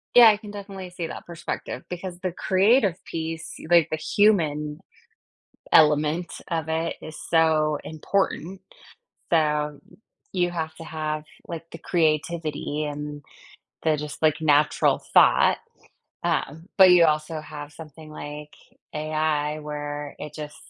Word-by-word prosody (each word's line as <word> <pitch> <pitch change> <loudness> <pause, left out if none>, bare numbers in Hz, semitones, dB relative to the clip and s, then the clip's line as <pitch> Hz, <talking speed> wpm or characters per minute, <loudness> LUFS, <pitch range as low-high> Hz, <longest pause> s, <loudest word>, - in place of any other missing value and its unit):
Yeah. 235 -2 +10
I 210 - +3
can 210 -1 -10
definitely 195 -2 -8
see 175 -2 -5
that - - -8
perspective 170 -1 -5
because 180 0 -6
the 185 -1 -2
creative 195 +2 +3
piece, 160 0 -5
like, 170 -2 +5
the 155 - 0
human 155 -6 +2 0.9
element 155 +2 +4 0.2
of 160 -2 -2
it 160 +1 -1
is 155 0 -8
so 155 -2 +3
important, 185 +2 -2 0.7
so, 150 -2 +1 0.5
you 175 -1 +1
have 160 -2 -4
to 165 - -10
have, 155 -1 -3 0.2
like, 165 -1 -6
the 165 - -8
creativity 155 -2 -1
and 145 0 -5 0.6
the 155 -2 +2
just, 150 0 -6
like, 155 0 +3
natural 150 -1 +3
thought, - - +6 0.7
um, 160 +5 -2
but 190 -1 +9
you 175 -1 +7
also 155 0 0
have 150 -1 -9
something 155 0 -12
like 150 0 -8 0.4
AI 155 -1 -1
where 145 -1 -5
it 150 0 -8
just 150 -1 -7
160 Hz, 130 wpm, -25 LUFS, 150-170 Hz, 0.9 s, Yeah